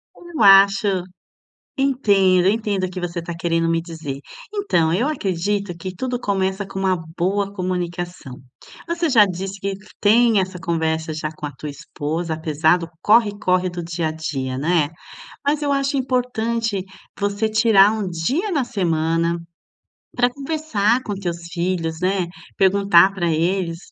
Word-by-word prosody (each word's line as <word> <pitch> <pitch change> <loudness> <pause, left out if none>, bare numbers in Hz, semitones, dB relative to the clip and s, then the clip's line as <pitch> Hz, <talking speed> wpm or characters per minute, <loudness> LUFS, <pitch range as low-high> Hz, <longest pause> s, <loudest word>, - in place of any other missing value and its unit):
Eu 345 -6 -7
acho 195 -1 +6 0.7
entendo, 200 -9 +3
entendo 205 -2 0
o - - -5
que 185 0 -6
você 170 -1 -3
tá 170 +1 -6
querendo 165 -1 0
me 165 0 +1
dizer. 160 -5 -6 0.3
Então, 285 - +1
eu 235 +9 +1
acredito 200 - -2
que 185 +2 -6
tudo 250 +4 -3
começa 195 -2 -1
com 195 0 -6
uma 190 -1 +2 0.2
boa 200 +3 0
comunicação, 175 -5 -4 0.5
você 340 -1 0
já 225 -6 +6
disse 195 +1 -5
que 195 0 -2 0.3
tem 225 +1 +5
essa 185 -1 -2
conversa 160 -1 -1
já 155 0 -3
com 155 - -8
a 145 - -5
tua 145 +2 -8
esposa, 160 +3 -4
apesar 160 +1 +2
do 170 -2 -7
corre 210 -1 +4
corre 185 -2 +1
do 175 -1 -6
dia 165 0 -2
a 155 - -2
dia, 135 -5 -4
né, 155 +1 +1 0.6
mas 295 +1 +1
eu 285 - +1
acho 275 +1 0
importante 235 -5 -1 0.3
você 205 +2 0
tirar 215 -2 +5
um 215 -3 -2
dia 255 - -1
na 290 -8 +1
semana 170 -5 0 0.8
pra 245 0 +3
conversar 270 -6 0
com 210 - -4
teus 175 -4 -4
filhos, 170 -2 -2
né? 185 -1 0 0.3
Perguntar 195 -1 +5
pra 175 -3 -1
eles 170 +1 0
190 Hz, 155 wpm, -21 LUFS, 170-215 Hz, 0.8 s, acho